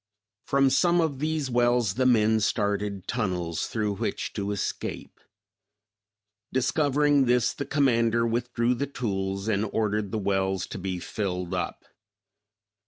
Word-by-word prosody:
From 135 -1 +3
some 175 +3 +3
of 155 -5 0
these 155 -3 -1
wells 120 -3 +2
the 130 +3 +2
men 110 -2 +4
started 100 -2 -1
tunnels 90 -8 -2
through 105 -3 -2
which - - -3
to 100 0 -3
escape. 100 - -4 1.3
Discovering 145 +1 +2
this, 125 -1 +2
the 140 - -5
commander 115 -5 +2
withdrew 120 +1 0
the 140 +3 -2
tools, 100 -6 -3
and 105 -2 +1
ordered 105 -2 -1
the - - -1
wells 95 -2 0
to - - -6
be 95 -1 -3
filled 90 -1 -3
up. - - -3
115 Hz, 130 wpm, -26 LUFS, 100-130 Hz, 1.3 s, men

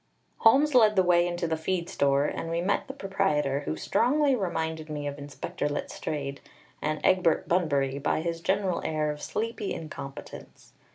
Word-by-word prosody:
Holmes 280 +6 +5
led 220 -4 +6
the 190 - +5
way 175 -1 +4
into 175 0 -2
the 160 -1 0
feed 170 +2 -2
store, 140 -6 +2
and 165 - -3
we 165 0 -1
met 195 +9 0
the 270 - -6
proprietor, 190 - 0
who - - -2
strongly 275 - +2
reminded 160 -6 -3
me 150 -1 -4
of 145 0 -4
Inspector 145 +1 -4
Letstrayed 145 -1 -4 0.4
and 155 0 -1
Egbert 180 -4 +3
Bunbury 140 -6 +1
by 145 - 0
his 165 0 -3
general 190 -1 0
air 155 -1 0
of 150 0 -8
sleepy 225 -2 -3
incompetence. 140 -3 -9
165 Hz, 165 wpm, -28 LUFS, 150-195 Hz, 0.4 s, led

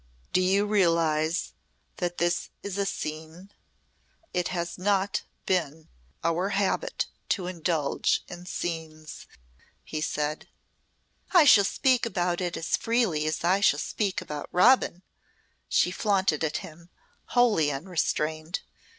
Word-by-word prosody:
"Do 185 - +4
you 195 +2 +3
realise 165 -5 +1 0.4
that 175 -1 -2
this 175 0 0
is 200 -1 -4
a 200 - +1
scene? 160 +4 -6 0.8
It 180 -1 0
has 170 -1 -3
not 200 +1 +1 0.2
been 160 -4 -1 0.3
our 170 +4 +1
habit 205 - 0 0.2
to 185 - 0
indulge 165 -4 0
in 180 0 -10
scenes," 160 -3 -5 0.6
he 155 - -5
said. 150 0 -2 0.9
"I 350 -4 +7
shall 205 -7 +7
speak 255 +2 +2
about 180 -3 -1
it 175 -1 -2
as 165 - 0
freely 225 -10 +1
as 155 +1 -2
I 185 +3 +3
shall 200 -7 +4
speak 200 +5 -2
about 150 -5 -6
Robin," 185 -2 +4 0.7
she 180 - +3
flaunted 190 -6 +1
at 155 - 0
him, 170 +2 -14 0.5
wholly 210 -12 +4
unrestrained. 155 +1 -2
175 Hz, 125 wpm, -27 LUFS, 160-195 Hz, 0.9 s, I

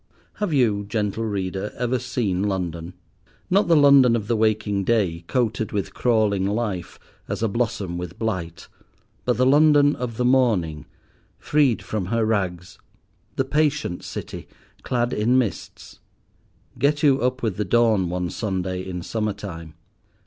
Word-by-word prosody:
Have 210 -4 -2
you, 115 -8 +2
gentle 105 +1 -2
Reader, 95 -1 -3
ever 125 +1 0
seen 115 -7 -2
London—not 90 - -3
the 170 - +5
London 140 -5 +6
of 110 -3 -2
the 115 - +1
waking 110 -2 +1
day, 95 -6 0
coated 110 -4 -1
with 100 -2 -3
crawling 105 -5 +1
life, 100 -5 -3 0.3
as - - -3
a - - +3
blossom 100 -5 -2
with 90 +1 -7
blight, 95 -8 -4 0.6
but 125 - +1
the 130 - +3
London 145 +1 +5
of 115 -2 -5
the 125 - 0
morning, 105 - +1 0.5
freed 145 -6 +1
from 105 -4 -3
her 115 +2 +1
rags, 95 -4 -2 0.6
the 135 - 0
patient 150 - 0
city, - - -7 0.3
clad 120 -1 -1
in 115 +5 +2
mists? 120 -6 -4 0.8
Get 145 +1 +1
you 140 -2 +4
up 125 +1 -1
with 110 -5 -1
the 105 - 0
dawn 110 -3 +2
one 90 -1 -2
Sunday 95 -3 -3
in 90 -2 -6
summer 105 +1 -2
time. 85 -6 -9
110 Hz, 145 wpm, -23 LUFS, 95-125 Hz, 0.8 s, London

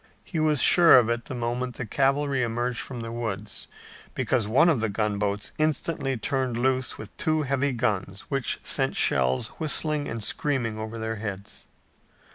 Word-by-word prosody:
He 165 - -4
was 155 -4 +3
sure 170 -6 +8
of 120 -2 +4
it 120 0 -1
the 130 - -6
moment 120 +1 -3
the 125 - -4
cavalry 135 +3 +1
emerged 120 0 -1
from 125 -3 -5
the 115 0 -6
woods, 110 -3 -4 0.5
because 120 -5 0
one 135 +10 +4
of 160 -8 +3
the 110 - 0
gunboats 105 0 -1
instantly 155 -3 -1
turned 130 0 -1
loose 130 +1 0
with 110 - -10
two 155 -1 +1
heavy 140 0 0
guns 100 -5 -2
which 135 -4 -2
sent - - +1
shells 65 - +2
whistling 155 -1 +1
and 115 -1 -4
screaming 120 -5 -1
over 110 +1 -5
their 110 0 -3
heads. 100 -2 -6
120 Hz, 165 wpm, -26 LUFS, 110-140 Hz, 0.5 s, sure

